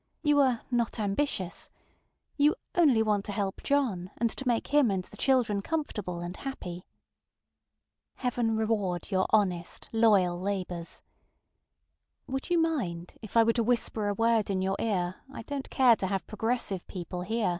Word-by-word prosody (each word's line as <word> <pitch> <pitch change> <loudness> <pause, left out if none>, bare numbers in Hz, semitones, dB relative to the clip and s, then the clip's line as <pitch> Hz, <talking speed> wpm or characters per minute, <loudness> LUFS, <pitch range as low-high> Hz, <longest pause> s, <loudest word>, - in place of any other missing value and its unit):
You 295 -2 +4
ŌĆ£are 260 -5 +3
not 235 -1 0
ambitious; 200 -2 -1
ŌĆØ - - -41
you 295 +3 +4 0.2
ŌĆ£only 275 -10 +4
want 210 -2 +1
to - - -4
help 200 -1 -2
John, 230 -11 0
and 230 0 +1
to 270 - -4
make 235 -2 +1
him 290 -5 +5
and 190 -2 -1
the - - -15
children 240 -7 +2
comfortable 210 - -3
and 175 +1 -5
happy. 180 -10 -6
ŌĆØ - - -55 0.3
Heaven 235 -3 +1
reward 210 -5 -1
your 185 -1 +2
honest, 185 -5 0
loyal 195 -6 +3
endeavors! 180 -4 -3 1.2
Would 270 0 -4
you 350 - +3
mind 195 - -1
if 220 0 -4
I 230 - +8
were 230 +1 +3
to 235 - +1
whisper 225 -2 0
a 205 - 0
word 225 -1 +2
in 190 -1 0
your 190 0 0
ear 185 -5 -1
I 230 - -7
donŌĆÖt 275 +2 -5
care 250 -3 +5
to 190 - -1
have 195 0 -2
progressive 220 -3 -2
people 180 -1 -5
hear? 220 +2 0
215 Hz, 165 wpm, -29 LUFS, 185-245 Hz, 1.2 s, I